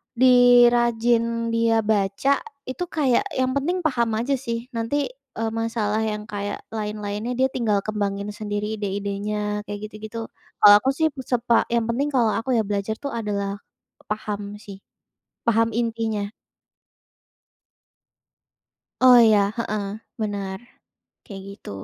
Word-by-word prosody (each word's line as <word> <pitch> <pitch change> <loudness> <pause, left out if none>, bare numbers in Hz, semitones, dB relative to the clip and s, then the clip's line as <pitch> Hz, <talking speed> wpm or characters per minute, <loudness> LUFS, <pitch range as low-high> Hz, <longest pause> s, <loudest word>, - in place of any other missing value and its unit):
di 245 -1 +7
rajin 230 -1 +1
dia 230 -1 +3
baca 210 +6 +1 0.3
itu 260 +7 -3
kayak 275 -6 +2
yang 260 0 +1
penting 340 +7 0
paham 235 -6 +1
aja 275 +4 0
sih 235 -1 -4
nanti, 265 +5 -1 0.3
eee, 225 0 -1
masalah 225 -2 -1
yang 210 -1 -2
kayak 205 0 -4 0.2
lain-lainnya 210 +1 -3
dia 260 - +4
tinggal 220 -5 +1
kembangin 200 -1 -2
sendiri 210 0 -3
ide-idenya 205 +1 -3
kayak 205 -1 -6
gitu-gitu. 215 +2 -7 0.3
Kalau 205 -1 +9
aku 265 - +2
sih 315 +3 +2
itu 280 - -13
sepa 240 -2 +2
yang 235 -1 +2
penting 275 +5 0
kalau 230 -4 +3
aku 240 +3 -2
ya 220 - +2
belajar 205 +1 -2
tuh 280 - -4
adalah 200 -3 -2 0.5
paham 205 -1 -4
sih, 200 -2 -10 0.7
paham 230 0 +3
intinya. 225 -3 -1 2.7
Oh, 255 -1 +8
iya 215 -2 +5 0.2
heeh, 215 -3 -2 0.4
benar 200 -2 -3 0.6
kayak 195 -2 -9
gitu. 200 - -11
225 Hz, 130 wpm, -23 LUFS, 205-240 Hz, 2.7 s, Kalau